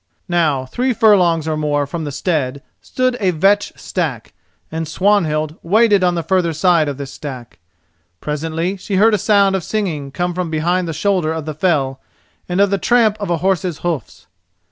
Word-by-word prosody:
Now 155 -7 +1
three 250 - -1
furlongs 180 -8 +3
or 155 - 0
more 145 -1 0
from 160 +3 -5
the 145 - -4
stead 140 -3 -2 0.2
stood 255 -1 -1
a 195 -4 +1
vetch 195 +5 +2
stack, 150 - -4 0.4
and 160 0 -3
Swanhild 155 -4 +1
waited 205 +2 +3
on 180 -1 +2
the 170 - -2
further 180 -3 +1
side 165 -1 +3
of 140 - -5
this 140 -1 -7
stack. 125 - -8 0.6
Presently 165 +5 -3
she 195 +1 -4
heard 215 +4 +4
a 210 - +2
sound 200 -1 +3
of 190 - -2
singing 160 -9 -3
come 175 +5 -2
from 180 -1 -3
behind 175 +3 0
the - - -2
shoulder 175 0 0
of 160 -2 -4
the 155 - -4
fell 145 -5 0 0.5
and 180 +2 -1
of 200 0 +3
the 200 - +1
tramp 230 -2 +3
of 205 - -4
a 170 - +1
horse's 185 -4 0
hoofs. 165 -9 -4
170 Hz, 185 wpm, -18 LUFS, 155-195 Hz, 0.6 s, heard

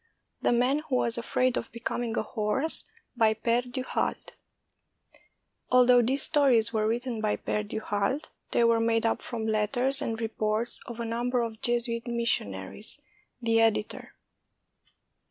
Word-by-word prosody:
THE - - +2
MAN 250 +4 +2
WHO 300 -4 -3
WAS 235 -2 +1
AFRAID 255 +1 +1
OF 230 - -4
BECOMING 235 0 -3
A - - +1
HORSE 225 +8 0 0.3
BY 220 -2 +3
pfeRE 235 +2 +1
DU 255 +1 -3
HALDE - - -2 1.4
[Although 250 0 +6
these 265 +4 0
stories 260 -8 +3
were 215 -1 +1
written 235 0 -2
by 215 -1 +1
Pere 210 - -2
du 210 +1 -4
Halde, 210 +10 -1 0.2
they 235 - +2
were 230 0 +4
made 225 0 +1
up 225 - +1
from 230 -2 -4
letters 245 +5 +2
and 225 -1 -2
reports 220 0 -1
of 235 -1 -7
a 235 - -2
number 240 +2 0
of 225 -1 -6
Jesuit 235 0 -1
missionaries. 215 - -2 0.4
The 225 -1 +3
Editor. 220 -1 0
235 Hz, 150 wpm, -28 LUFS, 220-245 Hz, 1.4 s, Although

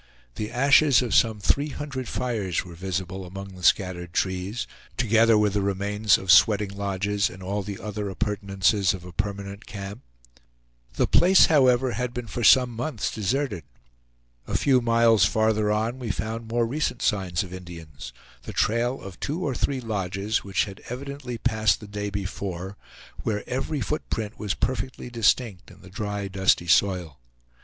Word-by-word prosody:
The 105 +10 -4
ashes 135 +1 +5
of 120 - -3
some 110 -2 +3
three 140 +8 +1
hundred 140 -3 -5
fires 110 -10 -2
were 90 - -10
visible 95 +1 -4
among 95 +2 -8
the 90 -1 -12
scattered 90 -2 +1
trees, 95 +5 -1 0.3
together 115 -1 +4
with 105 -2 +2
the 105 - +1
remains 100 +2 +2
of 95 -1 +1
sweating 100 +2 +5
lodges, 100 0 -1
and 95 +1 -11
all 100 +2 -2
the 100 0 -6
other 105 -1 -4
appurtenances 100 0 +1
of 90 -1 -11
a 90 - -9
permanent 100 +1 -5
camp. 100 +3 -7 0.9
The - - +2
place 185 +1 +6
however 130 -3 +4
had 120 +2 -3
been 120 -1 -4
for 120 +2 -5
some 125 +4 +6
months 120 0 -3
deserted. 110 - -1 0.8
A - - 0
few 130 -3 +3
miles 115 -3 +4
farther 110 +1 +2
on 110 +4 -1
we 120 -3 -5
found 110 +4 -3
more 120 +1 +1
recent 130 0 -2
signs 95 -5 0
of 90 -1 -10
Indians; 85 -8 -9 0.3
the - - -8
trail 120 +4 +1
of 95 -3 -10
two 165 +6 -3
or 140 - -1
three 130 +1 -1
lodges, 100 -1 -2
which 100 -1 0
had 100 -2 -10
evidently 130 -1 -6
passed 110 -3 +1
the 105 - -10
day 105 0 -4
before, 95 -1 -5 0.5
where 105 -2 -3
every 135 +3 -2
foot 150 +7 -3
print 110 -1 -4
was 105 -4 -2
perfectly 130 0 -3
distinct 115 -4 +1
in - - -16
the 95 - -13
dry, 105 -1 -3
dusty 95 -2 +2
soil. 90 -4 +2
105 Hz, 165 wpm, -25 LUFS, 95-120 Hz, 0.9 s, place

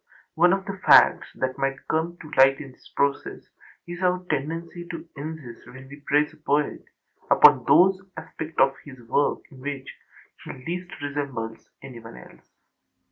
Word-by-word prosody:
One 175 +2 +4
of 195 0 0
the 195 -1 -6
facts - - +6
that 130 +1 -3
might 135 0 -2
come 165 +2 -1
to 155 - -12
light 135 +1 +5
in 140 -3 -9
this - - -20
process 140 -1 -1 0.4
is 175 +1 -8
our 180 0 0
tendency 165 +4 -4
to 165 -1 -7
insist, 145 -5 -8
when 130 +1 -13
we 140 - -11
praise 150 +2 +2
a - - -18
poet, 150 0 -1 0.5
upon - - +6
those 190 +1 +5 0.2
aspects 160 0 -8
of 135 - +4
his 135 -3 -12
work 145 +5 +1
in 135 - -14
which 140 -1 -6 0.5
he - - -7
least 175 +7 -6
resembles 135 -6 -5
anyone 115 -4 -11
else. - - -16
145 Hz, 160 wpm, -24 LUFS, 135-170 Hz, 0.5 s, facts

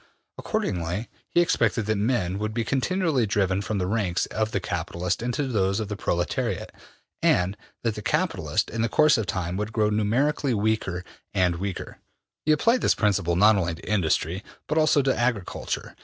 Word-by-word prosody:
Accordingly, 90 +6 -2 0.2
he 175 - +4
expected 115 -9 +1
that 110 +1 +1
men 100 -4 0
would 110 +1 -3
be 115 - +1
continually 140 - +1
driven 100 -1 +1
from 105 +1 -2
the 90 - 0
ranks 95 -3 0
of 110 0 -1
the 100 - -1
capitalists 90 +1 -2
into 125 +4 -1
those 100 -5 +1
of 105 -2 -3
the 105 - -3
proletariat, 85 -3 -1 0.5
and 90 +2 +3 0.3
that 115 -2 +1
the 105 - -6
capitalists, - - 0
in 115 - -1
the 115 - +1
course 155 +5 +5
of 105 - -2
time, 90 +1 -2
would 105 +1 -3
grow 105 -1 +1
numerically 125 +6 +1
weaker 100 -4 0 0.3
and 90 -3 +2
weaker. 95 +1 -5 0.5
He - - +5
applied 230 +12 +3
this - - +3
principle 100 -5 +1
not 105 +4 +6
only 85 -3 -1
to 85 - -13
industry 90 -1 0 0.2
but 155 - +1
also 155 -2 +4
to 135 0 +2
agriculture. 120 -6 -2
105 Hz, 175 wpm, -25 LUFS, 95-120 Hz, 0.5 s, not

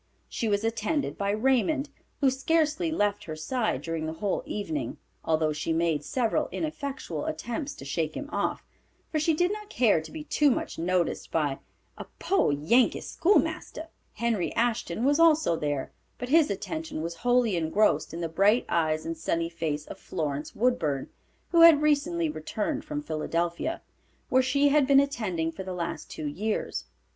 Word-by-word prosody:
She 230 - -3
was 205 0 +1
attended 225 +6 -1
by 200 0 -2
Raymond, 265 +6 +1 0.3
who 270 -2 +5
scarcely 315 +4 +1
left 205 -9 0
her 155 - -5
side 155 - -1
during 165 -1 -3
the 160 - -3
whole 200 +2 -1
evening, 155 - -3 0.3
although 155 -1 +1
she 155 +2 -2
made 160 -3 +1
several 250 - 0
ineffectual 275 - -4
attempts 240 - -4
to 135 - -10
shake 155 +2 -2
him 285 - -5
off, - - -2 0.5
for 310 - +1
she 310 +1 +2
did 355 +4 +2
not 420 -1 -8
care 225 - +3
to 160 - -11
be 315 -1 -6
too 295 -1 +3
much 245 - -2
noticed 175 0 0
by 145 -4 0 0.4
a - - -6
"poor 385 - +2
Yankee 180 - +3
schoolmaster." 325 -3 0 0.2
Henry 225 -5 -1
Ashton 235 -2 0
was 290 +3 +3
also 315 - +5
there, 145 -3 -2 0.3
but 245 - -5
his 315 -1 +5
attention 260 - -4
was 170 0 -5
wholly 245 -1 +2
engrossed 160 0 +2
in 165 +2 -5
the 165 - -1
bright 200 +8 +3
eyes 155 -2 0
and 165 0 -3
sunny 165 +1 -1
face 155 -3 -3
of - - -9
Florence 145 -1 -4
Woodburn, 170 - 0 0.4
who 335 - +5
had 325 -3 +8
recently 310 +3 +2
returned 280 - -3
from 300 -1 -4
Philadelphia, 170 - -2 0.5
where 260 - +5
she 280 +2 +3
had 285 -1 +4
been 275 -1 +7
attending 210 - -1
for 165 - -8
the 185 -1 -5
last 170 -1 -4
two 155 - -6
years. 205 +9 -2
215 Hz, 170 wpm, -27 LUFS, -, 0.5 s, had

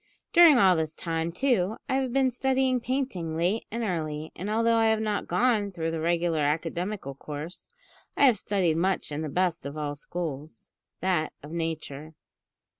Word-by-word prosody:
During 335 -5 +8
all 190 -4 +6
this 160 -1 -2
time, 165 -1 -2
too, 220 -2 +1
I 270 - -1
have 260 -2 -1
been 265 0 +2
studying 260 0 +1
painting 230 -11 -2
late 180 +7 0
and 230 +2 -3
early, 155 -5 -3
and 195 +4 -5
although 230 +1 +2
I 225 0 +4
have 220 0 +3
not 215 -2 -2
gone 220 -5 +2
through 165 -3 -3
the 165 - -3
regular 170 0 +1
academical 165 +2 -2
course, 150 +5 -8 0.5
I - - +6
have 240 -7 +4
studied 185 -7 +1
much 185 -1 0
in 145 +1 -3
the 155 - -3
best 175 +1 0
of 140 +2 -6
all 145 -1 -2
schools, 150 -4 -6 0.3
that 180 -4 0
of 150 - -9
Nature. 160 -2 -4
175 Hz, 175 wpm, -27 LUFS, 160-225 Hz, 0.5 s, During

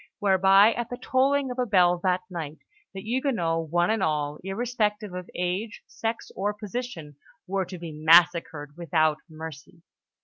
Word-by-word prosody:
whereby 195 +1 +5
at 240 -1 -4
the 245 - -5
tolling 270 +1 +1
of 250 - -6
a 250 - +2
bell 180 -4 +4
that 180 0 +1
night, 160 -4 -6 0.3
the 195 - -7
Huguenots, 215 - -1
one 175 +4 +2
and 220 -2 0
all, 150 -3 -1
irrespective 210 -1 -2
of 180 0 -7
age, 185 +5 -3
sex, 225 0 -5
or 205 +2 -1
position, 210 - -6 0.3
were 190 0 -1
to 180 +1 -8
be 170 -1 -7
massacred 160 -1 +3
without 155 -2 +1
mercy. 160 +1 -10
185 Hz, 150 wpm, -26 LUFS, 165-220 Hz, 0.3 s, whereby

